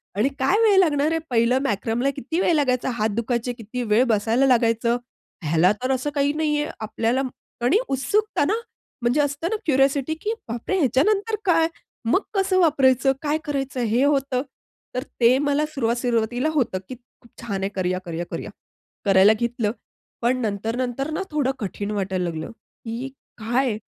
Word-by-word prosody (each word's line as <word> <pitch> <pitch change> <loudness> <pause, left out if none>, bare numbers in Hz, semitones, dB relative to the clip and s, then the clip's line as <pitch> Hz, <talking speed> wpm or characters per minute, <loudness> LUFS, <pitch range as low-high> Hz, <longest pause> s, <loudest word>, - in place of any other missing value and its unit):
आणि 225 +7 +2
काय 320 +11 +3
वेळ 415 -4 +5
लागणार 305 -3 +3
आहे? 325 - +1
पहिलं 240 +2 +3
मॅक्रमला 230 +3 0
किती 320 +6 -3
वेळ 345 - +3
लागायचा, 260 -3 +1
हात 220 -2 0
दुखायचे 235 +1 -1
किती 240 +2 -5
वेळ 230 +4 +5
बसायला 225 +6 +2
लागायचं? 235 -1 +3 0.5
ह्यालातर 185 - +2
असं 260 +3 0
काही 280 0 +2
नाहीये 300 -1 0
आपल्याला 230 +4 0 0.4
आणि 345 +12 +4
उत्सुकत 415 +11 0
ना, 420 - +2 0.5
म्हणजे 245 +5 +2
असतं 285 +3 -1
ना - - +1
क्युरिओसिटी, 275 +1 +2
की 435 +2 -1
बापरे 240 +12 -2
ह्याच्यानंतर 395 - +2
काय? 330 -2 +4 0.4
मग 375 - +3
कसं 385 -1 +2
वापरायचं? 270 -5 +4
काय 300 0 0
करायचं? 270 -3 -2
हे 235 +4 +2
होतं. 275 -3 +1 0.5
तर 255 - -1 0.2
ते 240 +3 +6
मला 290 +2 +2
सुरुवात 235 -4 0
सुरुवातीला 240 +3 0
होतं, 250 -10 +1
की 255 - -5
खूप 240 -1 -25
छान 200 -5 -3
आहे 195 - 0
करूया-करूया-करूया. 180 -2 -3 0.6
करायला 195 +2 +6
घेतलं, 235 -3 0 0.5
पण 245 +2 +2
नंतर-नंतर 235 +6 -2
ना, 380 - -2
थोडं 285 -3 +1
कठीण 205 0 -4
वाटायला 190 -3 -1
लागलं 160 +6 -5
की 230 +2 -8 0.3
काय? 240 0 0
250 Hz, 155 wpm, -23 LUFS, 225-290 Hz, 0.6 s, ते